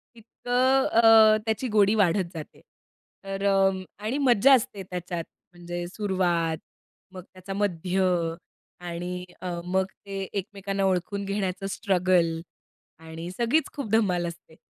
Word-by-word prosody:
तितकं 250 +4 +1
अ, 225 -1 +6
त्याची 220 +3 -1
गोडी 210 0 +4
वाढत 190 -3 +2
जाते. 155 -2 -9 0.6
तर 195 0 -5
अ, 195 -1 +4 0.3
आणि 240 +6 -1
मज्जा 270 -1 +5
असते 210 -5 +1
त्याच्यात, 175 -2 -5 0.3
म्हणजे 175 0 -6
सुरुवात, 180 -5 0 0.6
मग 185 -1 -8
त्याचा 185 +1 -8
मध्य 190 -2 -1 0.8
आणि 180 +1 -5 0.2
अ, 185 - -5 0.2
मग 190 +1 +1 0.2
ते 195 -1 -5
एकमेकांना 195 0 -3
ओळखून 190 +2 -1
घेण्याचं 195 -1 -2
स्ट्रगल 180 -5 +1 0.6
आणि 165 +1 -8
सगळीच 240 +10 +1
खूप 280 -8 -5
धमाल 185 -6 +2
असते. 165 -1 -10
195 Hz, 120 wpm, -26 LUFS, 175-215 Hz, 0.8 s, अ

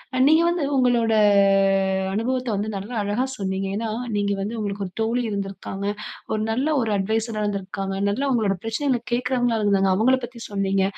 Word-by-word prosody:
அ - - 0
நீங்க 315 +3 +5
வந்து 345 -2 -1
உங்களோட 240 -3 +3 1.0
அனுபவத்த 250 +4 -1
வந்து 205 +2 -2
நல்ல 200 +5 -7
அழகா 205 +6 0
சொன்னீங்க. 195 -1 -2
ஏன்னா, 225 +1 -2 0.3
நீங்க 200 0 +1
வந்து 215 +4 -3
உங்களுக்கு 205 -1 -3
ஒரு 180 - -15
தோழி 235 +3 0
இருந்து 200 -2 -2
இருக்காங்க. 195 0 -6 0.5
ஒரு 215 - 0
நல்ல 255 +5 0 0.2
ஒரு 225 - -1
அட்வைஸாரா 220 +2 -1
இருந்துருக்காங்க. 195 -1 -3
நல்ல 205 +6 -1
உங்களோட 220 -6 +2
பிரச்சனைகளை 245 +2 0
கேட்குறவங்களா 245 -2 +1
இருந்தாங்க, 195 -1 +3
அவுங்க 215 +4 +1 0.2
பத்தி 240 0 -13
சொன்னீங்க. 195 -1 +1
215 Hz, 165 wpm, -23 LUFS, 195-245 Hz, 1.0 s, நீங்க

